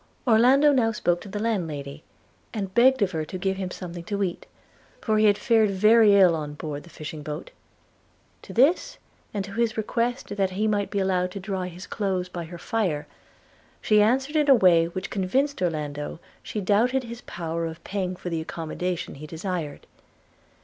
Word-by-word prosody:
Orlando 255 +6 +6
now 235 -4 +3
spoke 175 -5 0
to 205 - -10
the 205 - -5
landlady, 160 -10 -3 0.5
and 195 -3 -3
begged 255 +1 +5
of 190 - 0
her 160 -3 -2
to 185 - -6
give 190 +1 -1
him 190 -1 -3
something 175 -2 -7
to 200 0 -1
eat, 180 -3 -4 0.5
for 215 -2 +1
he 215 - +4
had 205 -1 +5
fared 225 -3 +3
very 210 +2 +5
ill 185 -4 +6
on 150 -2 -5
board 150 -1 -5
the 170 - -16
fishing 155 -1 -8
boat. 150 +2 -6 0.9
To - - -11
this, 275 +9 +3 0.3
and 200 -2 -3
to 200 - -10
his 230 +1 0
request 230 0 -2
that 195 -1 +2
he 205 +4 -1
might 205 -2 0
be 200 - -3
allowed 185 -2 +1
to 200 - -5
dry 190 -1 -3
his 180 +2 -9
clothes 185 -3 -2
by 175 -2 -5
her 170 +2 -9
fire, 175 -7 -1 0.7
she 210 -1 +4
answered 265 +7 +2
in 300 -2 +3
a 270 - +9
way 175 -6 +5
which 185 +2 -6
convinced 265 +9 0
Orlando 150 -3 -3 0.2
she 210 - -4
doubted 235 +7 +2
his 235 0 -8
power 165 -1 -4
of 165 +1 -9
paying 185 -2 -3
for 180 0 -6
the 165 -1 -1
accommodation 170 +2 -4
he 150 +2 -9
desired. 165 -1 -5
190 Hz, 185 wpm, -25 LUFS, 170-220 Hz, 0.9 s, a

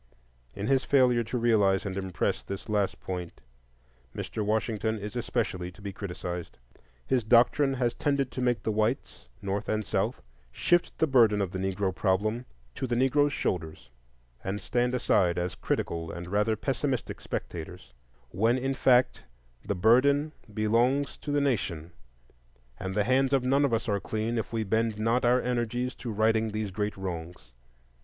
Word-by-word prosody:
In 100 0 -4
his 135 +1 +2
failure 125 -4 +4
to 115 +3 -3
realize 105 -5 +3
and 95 -1 -3
impress 95 -2 -1
this 100 0 -7
last 105 -2 0
point, 90 -2 -5 0.8
Mr. 110 - -3
Washington 110 +1 0
is 105 +3 -6
especially 105 -7 -2
to 95 - -18
be 100 -1 -5
criticised. 90 - -6 0.5
His 130 -3 +1
doctrine 125 +5 +4
has 120 -2 0
tended 140 0 0
to 130 - -4
make 125 -1 +1
the 110 - 0
whites, 110 - -1 0.2
North 100 +1 -2
and 110 -1 0
South, 85 - -1 0.3
shift 175 - +1
the - - +3
burden 115 -7 +4
of 95 -3 -1
the 95 - -4
Negro 95 0 -1
problem 110 +6 0 0.3
to 130 - -3
the 120 - 0
Negro's 145 +4 +3
shoulders 80 - -3 0.5
and 95 +2 -2
stand 125 +2 0
aside 90 -8 +2
as 90 -1 -1
critical 80 -1 -2
and 85 0 -7
rather 105 +2 +2
pessimistic 130 +2 -2
spectators; - - -6 0.4
when 115 - +2
in 135 +1 -1
fact 130 -2 +3 0.4
the 100 - -2
burden 135 - +4 0.2
belongs 120 +7 +1
to 145 - -5
the 145 0 +2
nation, 95 - -1 0.9
and 95 0 -4
the 105 - +3
hands 130 +4 +2
of 135 -2 +3
none 135 +3 +3
of 140 - +2
us 115 +2 0
are 100 -2 +1
clean 110 +3 -2
if 110 - -4
we 115 -1 -1
bend 110 +1 0
not 115 +3 +1
our 125 +1 +4
energies 125 +1 -1
to 120 - -6
righting 110 +1 +2
these 105 -1 -3
great 105 +2 -2
wrongs. 85 -7 -6
110 Hz, 165 wpm, -28 LUFS, 100-125 Hz, 0.9 s, failure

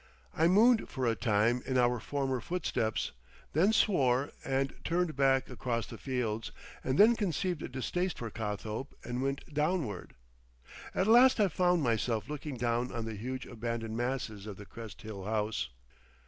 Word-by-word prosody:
I 160 - +4
mooned 220 +6 +5
for 130 -2 -2
a 115 - +3
time 115 +2 +2
in 130 - -1
our 125 -1 +3
former 135 0 -2
footsteps, 155 - -1 0.4
then 180 +8 +4
swore 140 - +3
and 135 0 0
turned 170 -2 0
back 135 -1 +3
across 120 -3 -2
the - - -10
fields, 115 -5 -2 0.3
and 130 +2 0
then 225 +3 +7
conceived 185 -4 -1
a - - -5
distaste 175 +8 -2
for 115 -2 -5
Cothope 110 +4 -4
and 120 +1 -3
went 135 +2 -3
Downward. 150 - -1 0.8
At 190 - +2
last 240 +3 +7
I 205 -2 +4
found 180 -1 +2
myself 115 -2 0
looking 150 -2 -5
down 120 +1 0
on 115 -2 -3
the 115 - -4
huge 125 +5 -5
abandoned 115 -1 -4
masses 120 -4 -3
of 100 -3 -7
the 100 - -10
Crest 115 +1 -10
Hill 105 -3 -7
house. 105 - -1
130 Hz, 160 wpm, -31 LUFS, 115-155 Hz, 0.8 s, then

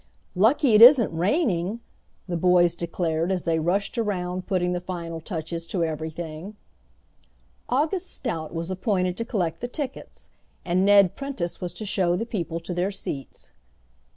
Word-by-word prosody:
"Lucky 230 - +3
it 210 - +6
isn't 240 - +8
raining," 195 - 0 0.5
the 175 - -2
boys 175 0 +4
declared 170 0 -1
as 185 -2 -1
they 165 -1 +1
rushed 195 +8 -1
around 185 -4 -2
putting 180 -2 0
the 175 - -2
final 170 -2 -6
touches 165 -1 -5
to 175 0 -1
everything. 160 +4 -5 1.1
August 315 +8 0
Stout 165 - -4
was 165 +2 -4
appointed 185 -1 0
to 230 - -2
collect 175 -9 -2
the 245 - -2
tickets, 270 +1 -7 0.3
and 180 +1 +2
Ned 200 -2 +5
Prentice 275 -12 -5
was 180 -1 -3
to 215 - -7
show 185 -3 +1
the 225 - -2
people 170 -7 -3
to 170 +2 -5
their 180 +3 0
seats. 140 -8 -7
180 Hz, 155 wpm, -25 LUFS, 170-210 Hz, 1.1 s, isn't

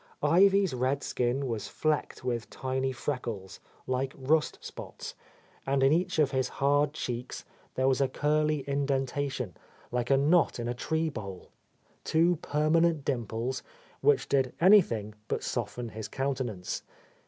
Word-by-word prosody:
Ivy's 190 +3 +5
red 130 +3 0
skin 125 +3 0
was 115 -5 -3
flecked 155 -4 -1
with 120 -3 -2
tiny 130 0 -2
freckles, 120 -7 -4 0.3
like 130 +1 -1
rust 150 +4 +1
spots, - - -8 0.5
and 135 0 +1
in 135 +2 +5
each 180 +2 0
of 150 -3 +3
his 130 -2 0
hard 145 +1 +2
cheeks 125 -4 -5 0.3
there 130 0 +2
was 135 0 +3
a 135 - +4
curly 150 +2 +1
indentation, 135 - -1 0.4
like 120 0 -1
a 135 - +5
knot 150 +1 +3
in 120 - -3
a 120 - -1
tree 160 +6 -1
bole, 100 -9 -8 0.3
— - - -37
two 170 +2 +4
permanent 155 +1 +2
dimples 120 -1 -2 0.4
which 440 -1 +3
did 135 -2 +1
any 195 +4 +8
thing 110 - -4
but - - -2
soften 120 -1 -3
his 110 0 -6
countenance. 130 -9 -3
135 Hz, 145 wpm, -29 LUFS, 125-150 Hz, 0.5 s, any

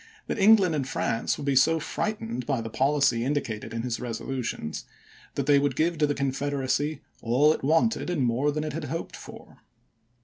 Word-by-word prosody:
that - - -3
England 200 -4 +6
and 140 -4 -1
France 115 -3 -1
would 145 - -6
be 140 -1 +1
so 160 +5 +4
frightened 125 - -3
by 135 -4 0
the 115 -1 -5
policy 135 -3 +2
indicated 125 -6 -2
in 115 0 -3
his 120 -2 -2
resolutions 120 -8 -4 0.5
that 140 - -1
they 145 0 +5
would 140 -2 0
give 165 +2 0
to 150 - +3
the 145 - -1
Confederacy 140 +2 -1
" - - -33
all 135 +7 +4
it - - -6
wanted, 165 +9 +2
and 165 -7 0
more 125 +5 +1
than 150 +1 -2
it 155 - -4
had - - -4
hoped 165 +4 -5
for." - - -12
140 Hz, 195 wpm, -26 LUFS, 125-155 Hz, 0.5 s, England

